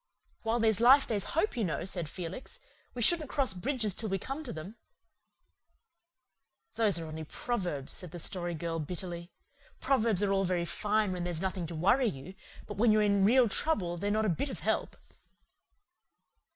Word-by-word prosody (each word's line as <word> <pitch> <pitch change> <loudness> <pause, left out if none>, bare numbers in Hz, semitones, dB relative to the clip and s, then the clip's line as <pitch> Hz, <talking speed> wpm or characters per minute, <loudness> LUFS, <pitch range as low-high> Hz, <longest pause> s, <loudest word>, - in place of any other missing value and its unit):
"While 225 +1 0
there's 220 -2 +3
life 265 +4 +7
there's 205 -4 -1
hope, 415 +1 +1
you 235 - -1
know," 165 -6 -2
said 175 -5 0
Felix. 175 - -7 0.4
"We 240 - -1
shouldn't 310 +2 +4
cross 265 -8 0
bridges 220 +1 -1
till 220 +3 -4
we 195 - 0
come 270 - -5
to 250 - -6
them." 175 +9 -8 2.0
"Those 220 -5 +3
are 165 - -3
only 160 0 -6
proverbs," 175 - -3
said 180 - -1
the 175 - -8
Story 175 0 0
Girl 165 +1 -3
bitterly. 170 +2 -5 0.5
"Proverbs 225 -7 +2
are 200 - +1
all 195 0 +2
very 180 -2 0
fine 210 +2 0
when 180 -1 -3
there's 175 -2 -3
nothing 185 -2 -3
to 165 - -6
worry 200 +11 +3
you, 160 -1 -6 0.3
but 205 - -8
when 225 +1 +4
you're 215 0 +4
in 200 -1 +3
real 245 +3 +5
trouble 195 - 0
they're 200 +4 -2
not 215 +1 +1
a - - +2
bit 175 - -1
of - - -7
help." - - -1
195 Hz, 180 wpm, -30 LUFS, 175-230 Hz, 2.0 s, life